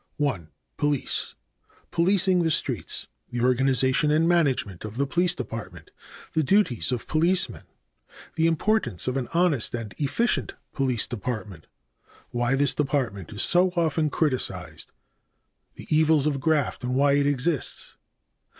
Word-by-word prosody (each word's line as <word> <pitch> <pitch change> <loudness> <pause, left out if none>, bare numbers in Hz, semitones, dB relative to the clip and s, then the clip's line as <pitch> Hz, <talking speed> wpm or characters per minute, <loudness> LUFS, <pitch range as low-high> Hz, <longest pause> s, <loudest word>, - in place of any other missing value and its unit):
1. 115 - -1 0.3
Police. 145 -2 -1 0.6
Policing 185 +1 +3
the 165 - +1
Streets. 155 - -2 0.2
The 120 -1 -3
organization 130 +3 +2
and 155 +2 +3
management 135 - +1
of 110 +1 -7
the 140 - +1
police 175 +5 +1
department. 115 -3 -7 0.4
The 160 - +2
duties 140 - +2
of 125 - -3
policemen. 170 +4 +1 0.7
The 165 0 +2
importance 165 - 0
of 130 - 0
an 130 -3 -2
honest 165 -10 +2
and 110 -4 -6
efficient 195 - 0 0.2
police 130 -5 +1
department. 105 -7 -5 0.6
Why 120 +2 +1
this 140 0 +1
department 125 - -2
is 105 - -2
so 180 +1 +4
often 160 -2 +1
criticized. 145 -3 -2 0.8
The - - -10
evils 155 -2 +4
of 145 -2 0
graft 150 -2 0
and 125 +1 -1
why 140 +1 +4
it 140 0 +3
exists. 145 +1 -1
140 Hz, 130 wpm, -25 LUFS, 125-160 Hz, 0.8 s, so